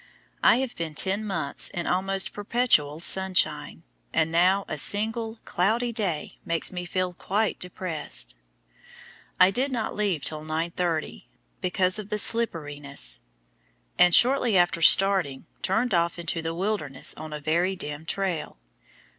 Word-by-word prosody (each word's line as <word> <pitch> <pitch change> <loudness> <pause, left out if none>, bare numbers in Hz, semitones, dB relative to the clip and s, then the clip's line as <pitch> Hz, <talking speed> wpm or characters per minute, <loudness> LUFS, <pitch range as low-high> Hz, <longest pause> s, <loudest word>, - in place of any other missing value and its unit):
I - - +6
have 255 0 -2
been 160 -2 -5
ten 195 +6 +1
months 190 -9 -2
in 175 - -4
almost 195 +1 0
perpetual 205 -9 +1
sunshine, 190 +2 +1 0.3
and 160 0 +1
now 185 +4 +3
a - - -4
single 225 +2 0
cloudy 230 +6 0
day 185 -9 -3
makes 165 -1 0
me 180 -1 -5
feel 180 0 -2
quite 205 +4 -1
depressed. 160 - -3 1.1
I 185 +1 +6
did 260 +7 0
not 235 -4 -3
leave 195 -8 -1
till 155 -1 -2
9:30, 165 +1 -3 0.4
because 185 +1 +1
of 210 -1 -8
the 210 - -1
slipperiness, 145 - +1 0.8
and 180 -1 +6
shortly 245 -4 +4
after 175 -1 +2
starting 185 -6 +4 0.2
turned 220 +4 0
off 170 0 +1
into 165 -1 -3
the 165 0 -4
wilderness 175 -8 -1
on 155 0 -9
a 150 - -5
very 170 +6 0
dim 150 -2 -6
trail. 185 - -2
180 Hz, 140 wpm, -25 LUFS, 160-205 Hz, 1.1 s, I